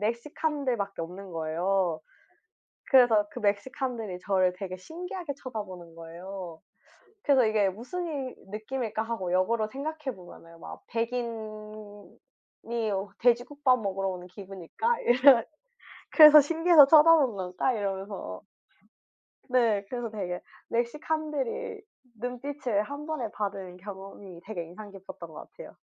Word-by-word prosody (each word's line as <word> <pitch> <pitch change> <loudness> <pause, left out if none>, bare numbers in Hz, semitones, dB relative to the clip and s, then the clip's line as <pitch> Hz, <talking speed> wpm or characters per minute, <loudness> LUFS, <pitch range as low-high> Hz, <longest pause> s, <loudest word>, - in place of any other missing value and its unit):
멕시칸들밖에 235 - -2
없는 185 +2 -8
거예요. 165 +1 0 0.9
그래서 235 -6 +6
그 - - -7
멕시칸들이 215 -1 -2
저를 185 -2 +2
되게 185 -1 -5
신기하게 345 - -6
쳐다보는 190 -10 -7
거예요. 170 +1 -8 0.6
그래서 270 -4 +4
'이게 210 -2 +3
무슨 255 - -5
이 275 -5 -4 0.2
느낌일까?' 220 +1 -3
하고 225 -6 -3
역으로 215 +4 +2
생각해 285 +1 -4
보면은 170 -2 -14
막 - - -9
'백인이 215 -3 -5 0.7
여 195 0 -2
돼지국밥 250 +2 +3
먹으러 195 -1 -1
오는 180 -1 -5
기분일까?' 195 - -3
이런 250 0 +6 0.7
'그래서 305 -2 +10
신기해서 330 0 +6
쳐다보는 305 -6 +6
걸까?' 185 +7 -1
이러면서. 200 -1 -4 1.1
네. 230 -5 +3
그래서 240 -2 -3
되게 185 -4 -4 0.3
멕시칸들의 295 +2 -2 0.4
눈빛을 250 -3 -2
1 285 +5 -7
번에 305 -8 -3
받은 195 -3 -4
경험이 195 -2 -10
되게 185 -5 -4
인상 190 +6 -10
깊었던 190 -1 -10
것 - - -11
같아요. - - -12
215 Hz, 295 characters per minute, -28 LUFS, 190-265 Hz, 1.1 s, 그래서